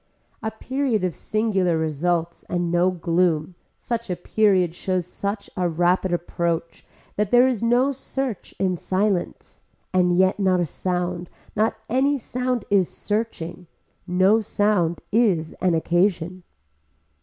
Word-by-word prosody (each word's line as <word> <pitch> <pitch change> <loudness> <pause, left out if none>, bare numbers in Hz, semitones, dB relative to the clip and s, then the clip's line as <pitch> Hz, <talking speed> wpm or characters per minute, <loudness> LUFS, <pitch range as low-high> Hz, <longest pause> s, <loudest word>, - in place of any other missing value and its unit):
A 220 - -1
period 250 -1 -1
of 180 -2 0
singular 195 -6 0
results 165 +2 -1
and 175 -1 -1
no 175 +1 +3
gloom 170 -1 0 0.2
such 235 -2 -4
a 180 - 0
period 185 -2 +2
shows 185 0 -2
such 200 +3 -4
a 180 -1 0
rapid 175 +3 +1
approach 170 -1 -2 0.3
that 210 -1 +1
there 245 +2 +6
is 250 -5 -1
no 245 +4 +3
search 270 -4 -4
in 185 -2 +1
silence 190 +1 -2 0.3
and 180 -1 +3
yet 190 +2 +3
not 185 -2 +3
a 175 - +2
sound, 175 +1 -3 0.3
not 215 +1 +2
any 270 +4 +2
sound 250 -2 -2
is 195 -3 +3
searching, 205 -5 -3 0.4
no 190 +5 +4
sound 205 -5 +1
is 200 -8 +2
an 180 -3 +3
occasion. 175 +1 +1
185 Hz, 130 wpm, -23 LUFS, 175-215 Hz, 0.4 s, there